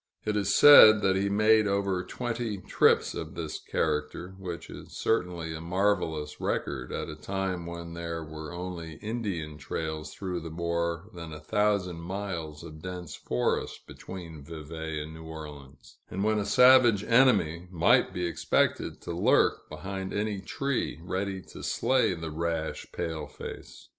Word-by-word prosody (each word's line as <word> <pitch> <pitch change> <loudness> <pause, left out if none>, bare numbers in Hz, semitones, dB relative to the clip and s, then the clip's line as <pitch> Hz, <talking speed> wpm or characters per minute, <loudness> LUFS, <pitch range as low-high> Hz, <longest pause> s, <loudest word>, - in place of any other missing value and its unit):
It 105 - 0
is 100 -1 +1
said 110 -7 +10
that 95 0 +3
he 100 +1 +1
made 110 +1 +4
over 100 -2 0
twenty 115 +1 -3
trips 95 - +3
of - - -6
this - - -4
character, 75 +4 -2
which 90 -3 -6
is - - -10
certainly 90 -6 -1
a 80 - -6
marvelous 85 -4 0
record 65 -3 -2
at - - -3
a 75 - -6
time 95 +1 -3
when 85 0 -7
there 85 -1 -4
were 80 0 -8
only 85 -2 -6
Indian 90 -7 -4
trails 80 -1 -4
through 90 -3 -3
the 80 0 -7
more 85 +3 -2
than 85 -2 -8
a 75 - -7
thousand 100 +1 +1
miles 85 -4 -5
of 80 -2 -10
dense 90 -2 -6
forest 60 - -2
between 85 -5 -9
Vevay 80 0 -6
and 80 +1 -9
New 80 0 -10
Orleans, 75 -4 -10
and 95 +2 -2
when 110 0 +2
a 100 - -1
savage 120 -1 +6
enemy 90 -10 +3
might 85 -2 +4
be 90 0 -2
expected 85 - 0
to - - -6
lurk - - +2
behind 95 +5 -5
any 105 -1 -1
tree, 140 - -2
ready 95 +1 -3
to - - -10
slay 130 -8 +2
the 80 -1 -6
rash 80 0 -2
pale 80 -3 -4
face. - - -10
90 Hz, 155 wpm, -28 LUFS, 80-100 Hz, -, said